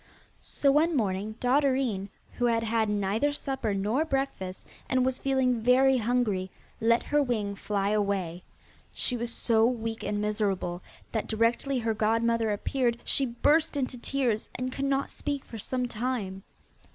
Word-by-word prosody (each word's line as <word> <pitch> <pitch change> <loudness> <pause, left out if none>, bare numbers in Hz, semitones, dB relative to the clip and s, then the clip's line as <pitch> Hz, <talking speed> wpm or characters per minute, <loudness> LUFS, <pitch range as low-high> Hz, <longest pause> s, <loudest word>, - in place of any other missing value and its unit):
So 280 - +1
one 310 +2 +3
morning 205 -1 -1
Dotterine, 255 -6 +1 0.3
who 245 - +2
had 230 -1 +2
had 225 -1 +1
neither 210 +7 +1
supper 265 -7 -2
nor 215 +9 +1
breakfast, 270 - -3 0.2
and 255 -1 +2
was 260 0 -1
feeling 260 -3 +1
very 260 +3 +5
hungry, 220 -5 0 0.3
let 230 +1 +3
her 295 0 +2
wing 220 -7 -1
fly 200 0 -1
away. 200 -5 -1 0.5
She 250 - 0
was 235 0 -2
so 225 -1 +2
weak 225 -2 0
and 205 0 -1
miserable, 205 -4 -1 0.3
that 220 - -2
directly 230 +5 +1
her 230 -2 0
godmother 225 +1 +1
appeared 235 +3 0
she 275 - +3
burst 300 +6 +2
into 260 -2 -1
tears, 240 -4 0
and 255 +1 -2
could 275 +1 -3
not 275 0 0
speak 285 -2 -4
for 225 - -8
some 250 +4 -2
time. 220 -5 -3
235 Hz, 150 wpm, -28 LUFS, 210-260 Hz, 0.5 s, very